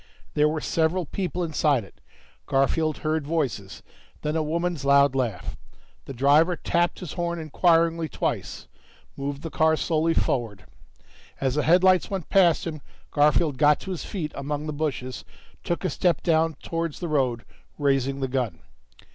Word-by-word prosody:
There 150 0 +3
were 155 0 -2
several 165 +4 0
people 180 +2 -3
inside 150 -6 +1
it; 95 - -18 0.5
Garfield 155 +3 +1
heard 155 -2 0
voices, 135 -12 -2 0.4
then 150 +1 -1
a 160 - +1
woman's 165 0 -2
loud 140 0 +5
laugh. 120 -8 -2 0.5
The 135 - -7
driver 150 +7 +4
tapped 175 +2 0
his 175 -5 -6
horn 170 -1 -2
inquiringly 165 0 +2
twice, - - -3 0.5
moved 140 +1 -5
the 165 - -5
car 160 0 +3
slowly 165 0 0
forward. 115 -6 -1 0.7
As 135 -2 0
the 150 - +1
headlights 185 +3 +4
went 190 -4 -4
past 175 -4 +4
him, 155 -3 -5 0.3
Garfield 150 -1 +2
got 150 0 +5
to 190 - -6
his 180 - -4
feet 160 -7 -4
among 145 +2 -4
the 155 - -3
bushes, 140 -4 -3 0.4
took 175 +2 -2
a - - +2
step 175 -2 +1
down 160 -1 +2
towards 165 -2 -3
the 175 - -3
road, 130 -7 0 0.3
raising 135 -1 0
the 135 - 0
gun. 125 -10 -2
155 Hz, 155 wpm, -25 LUFS, 140-165 Hz, 0.7 s, loud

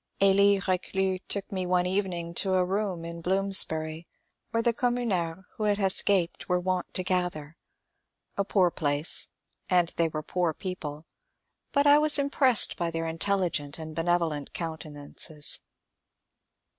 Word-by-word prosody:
Elie 200 0 +4
R^clus 190 0 -2
took 200 -1 -2
me 185 -2 -3
one 180 0 +1
evening 180 -3 -2
to 190 +2 0
a 185 -1 +2
room 190 -3 -3
in 170 0 -7
Blooms 195 +2 +3
bury 160 +1 -6 0.4
where 230 0 -1
the 235 -1 +2
communards 205 -9 -1
who 215 - -2
had 205 -1 +2
escaped 190 -3 +1
were 180 0 +2
wont 185 0 -2
to 185 - 0
gather. 180 -5 -2 0.8
A 200 - 0
poor 190 -3 +2
place, 145 0 +4 0.4
and 175 -2 +3
they 170 - +2
were 155 -1 -5
poor 170 -1 -1
people; 160 -5 -6 0.7
but 285 0 +2
I 290 +1 +7
was 305 0 +6
impressed 275 -4 +3
by 170 -1 -1
their 165 0 -3
intelligent 165 -4 -1
and 160 -1 -8
benevolent 165 -3 -1
countenances. 155 -2 -2
180 Hz, 145 wpm, -27 LUFS, 165-195 Hz, 0.8 s, I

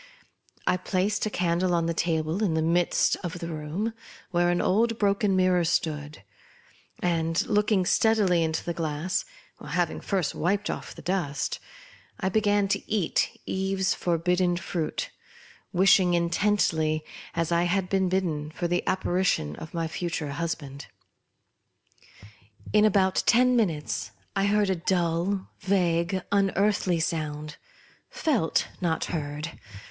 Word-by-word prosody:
I 180 - +2
placed 190 +2 0
the - - 0
candle 180 -1 +1
on 165 -1 +1
a 170 - 0
table 165 +3 0
in 175 -6 +1
the 160 - +1
midst 170 +2 +2
of 175 0 -4
the 170 -1 -5
room, 160 +8 -3 0.4
where 175 -1 +2
an 175 0 +1
old 225 +4 +2
broken 200 -1 +2
mirror 185 -1 +3
stood; 150 -7 -2 0.8
and, 165 -1 +1
look 210 +1 +2
ing 190 -3 +3
steadily 200 -5 +3
into 160 0 -1
the 170 - -3
glass 160 +2 -2 0.4
(having 170 +2 -1
first 185 -6 -1
wiped 195 +5 0
off - - -7
the - - -11
dust), 175 -6 -1 0.6
I 190 - 0
began 205 0 +2
to 195 - -2
eat 205 -6 0
Eve's 190 0 0
forbidden 175 +1 +1
fruit, 170 -3 -3 0.6
wishing 185 -1 +5
intently, 170 -3 +1 0.3
as 165 0 -1
I 170 +1 +3
had 185 +1 0
been 190 -1 +1
bidden, 165 -5 -1
for 170 +2 -3
the 175 +1 +1
apparition 180 - 0
of 160 - -8
my 165 -1 -1
future 165 -3 -3
husband. 140 -3 -4 1.9
In 210 0 +6
about 190 -2 +3
ten 250 +1 +5
minutes 170 -11 -1 0.3
I 195 0 +2
heard 205 -1 +2
a - - +1
dull, 175 +2 0
vague, 180 -1 +1
unearthly 195 -2 +2
sound; 155 -2 -3 0.5
felt, 260 - 0
not 165 -3 0
heard. 150 0 -5
175 Hz, 135 wpm, -27 LUFS, 165-195 Hz, 1.9 s, In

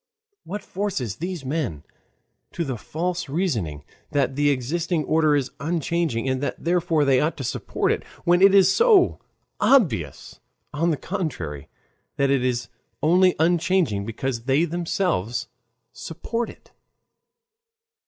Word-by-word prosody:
What 205 +2 -5
forces 180 - -3
these 175 -4 -5
men 130 - -2 0.7
to 170 - -2
the 130 -3 -3
false 165 +8 -3
reasoning 115 - -2 0.3
that 135 -2 0
the 145 +1 +3
existing 155 +5 -1
order 155 -1 +3
is 135 -2 -1
unchanging, 160 -4 -1
and 130 0 0
that 145 - -4
therefore 165 -3 +2
they 135 -2 +4
ought 155 +2 0
to 135 - -5
support - - -1
it, - - -1 0.2
when 175 +1 +4
it 195 0 +7
is 195 -2 +6
so 445 -6 +4 0.4
obvious, 155 - +1 0.3
on 165 +4 +1
the 155 - +1
contrary, 125 - -4 0.5
that 140 0 +2
it 135 -2 +2
is 120 -2 -1 0.4
only 180 +4 +4
unchanging 165 - +2
because 115 +2 -4
they 140 +5 +3
themselves 165 - -1 0.5
support 225 - -4
it? - - -16
155 Hz, 135 wpm, -24 LUFS, 130-175 Hz, 0.7 s, it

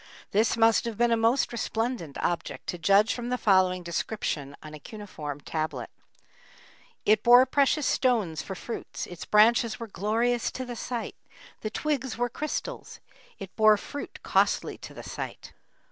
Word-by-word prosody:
This 220 +3 +2
must 225 0 +4
have 230 -3 -4
been 240 0 +3
a - - +5
most 230 +4 +2
resplendent 225 - -3
object, 175 - -2
to 175 - -3
judge 200 +6 +4
from 240 0 -5
the 250 - 0
following 185 -4 +3
description 165 -5 -3
on 155 0 -10
a 155 - -8
cuneiform 155 -7 -7
tablet: 150 -6 -4 1.1
It 215 0 +4
bore 245 +2 +7
precious 280 +2 +2
stones 220 - +1
for 190 - -6
fruits; 230 +5 -6
Its 175 -2 -9
branches 225 +1 +4
were 230 - -4
glorious 225 +3 0
to 255 - -4
the 245 -1 -6
sight; 235 0 -5 0.4
The 215 - -4
twigs 265 -1 -2
were 245 0 0
crystals; 305 - -5 0.4
It 195 -2 -9
bore 215 -1 +6
fruit 285 +7 -8
costly - - +1
to - - -10
the - - -8
sight. - - -7
220 Hz, 160 wpm, -27 LUFS, 185-240 Hz, 1.1 s, bore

